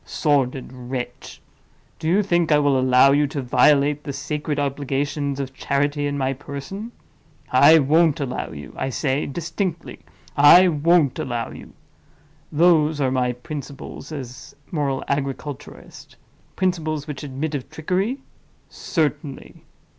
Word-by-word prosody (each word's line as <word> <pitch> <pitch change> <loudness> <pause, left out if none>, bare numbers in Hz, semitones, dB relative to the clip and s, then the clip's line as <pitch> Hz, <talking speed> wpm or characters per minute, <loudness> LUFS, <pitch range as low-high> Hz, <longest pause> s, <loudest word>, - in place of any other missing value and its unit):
Sordid 135 -4 0
wretch! 125 -1 -7 0.6
do 160 - -4
you 190 +5 +3
think 175 -4 +1
I 150 - +6
will 145 -2 +2
allow 130 +1 +5
you 145 +1 +3
to 140 - -5
violate 140 +3 +3
the 140 - -4
sacred 145 +2 -3
obligations 140 0 -2
of 135 -1 -4
charity 145 +2 -1
in 145 0 -3
my 135 -1 0
person? 145 - -7 0.6
I 145 +5 +7
won't 155 +2 +3
allow 135 -3 -3
you—I 75 - -6
say, 135 +2 -1
distinctly, 170 +3 -4 0.4
I 170 +6 +8
won't 160 -2 +2
allow 120 -3 -3
you. - - -12 0.8
Those 155 -1 +3
are 135 -2 +1
my 125 -1 0
principles 140 +3 -8
as 130 -5 -8
a - - -20
moral 140 -3 -1
agriculturist. 140 +1 -5 0.4
Principles 160 -5 -1
which 150 -4 -6
admit 145 +2 -4
of 140 -3 -4
trickery? 190 - -2 0.5
Certainly. 150 -4 -3
145 Hz, 130 wpm, -22 LUFS, 135-155 Hz, 0.8 s, I